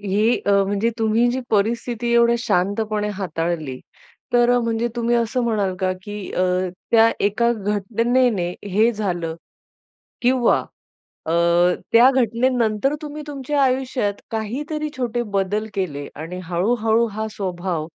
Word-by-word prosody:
ही 205 +4 +1
अ, - - +3 0.2
म्हणजे 205 +3 0
तुम्ही 225 +2 +2
जी 260 - -2
परिस्थिती 235 +3 0
एवढ्या 235 0 +5
शांतपणे 210 0 0
हाताळली, 165 -6 -3 0.5
तर 240 0 +4
म्हणजे 230 0 0
तुम्ही 235 0 +1
असं 235 +2 0
म्हणाल 205 -5 0
का 185 0 +1
की 205 +1 -7 0.2
अ, 185 - 0 0.5
त्या 230 0 +6 0.2
एका 235 +4 +2
घटनेने 210 0 0 0.2
हे 220 +4 +4
झालं 175 -6 -2 0.9
किंवा 250 -1 +3 0.7
अ, 160 - -1 0.6
त्या 240 +3 +7
घटनेनंतर 245 0 +1
तुम्ही 300 0 -6
तुमच्या 285 0 -1
आयुष्यात 255 -5 0
काहीतरी 290 +8 -3
छोटे 240 -2 -1
बदल 205 +3 0
केले 145 -7 -3
आणि 165 +4 -6
हळू-हळू 220 +6 +1
हा 220 +1 -3
स्वभाव 180 -5 -3
220 Hz, 125 wpm, -21 LUFS, 195-240 Hz, 0.9 s, त्या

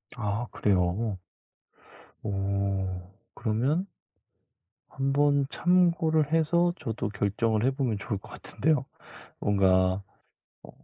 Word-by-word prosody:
아 110 0 -2
그래요. 95 +2 +1 1.1
어. 95 -2 -2 0.2
그러면 130 - 0 1.0
한번 140 +1 +2
참고를 170 -4 +2
해서 170 +2 +3
저도 110 -2 -3
결정을 105 +2 0
해 130 - +4
보면 130 -6 -1
좋을 100 0 -3
것 - - -15
같은데요. 150 -4 0 0.6
뭔가 95 -1 +3 0.6
어 - - -12
110 Hz, 185 characters per minute, -28 LUFS, 100-145 Hz, 1.1 s, 해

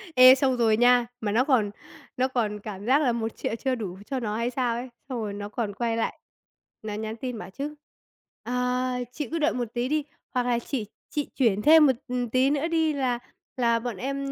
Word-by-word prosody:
Ê, 255 +1 +10
xong 260 -2 +1
rồi 220 -2 +3
nha, 245 0 +5
mà 205 -2 -1
nó 240 +4 +3
còn 235 -8 +2 0.5
nó 260 +1 +2
còn 215 -5 -1
cảm 205 -1 -7
giác 275 +5 +4
là 250 -4 +3
1.000.000 225 -1 -3
chưa 260 +2 -1
đủ 195 -6 -5
cho 270 - -2
nó 215 -3 -2
hay 235 +1 0
sao 245 -2 0
ấy. 245 +2 -5 0.2
Xong 250 - -3
rồi 210 -2 -3
nó 205 0 -6
còn 210 -2 -3
quay 230 +1 -1
lại, 225 - -2 0.6
nó 215 -1 -5
nhắn 220 +1 -4
tin 250 0 -5
bảo - - -8
chứ: 290 +7 -5 0.7
"Ờ, 250 +1 0 0.2
chị 295 -1 -5
cứ 330 - -1
đợi 305 - +2
một 245 -1 -1
tí 240 +1 -1
đi, 305 -1 +1 0.3
hoặc 250 -1 +1
là 240 -1 +1
chị 235 -3 -3 0.2
chị 295 -1 -2
chuyển 215 -6 +2
thêm 310 +2 +7
một, 265 - +5
ừm, 245 -1 -2
tí 260 +3 +3
nữa 295 +2 0
đi 320 -2 +1
là 255 -4 0 0.4
là 235 -2 +3
bọn 235 -3 -4
em, 275 +4 -3
245 Hz, 220 wpm, -26 LUFS, 225-265 Hz, 0.7 s, Ê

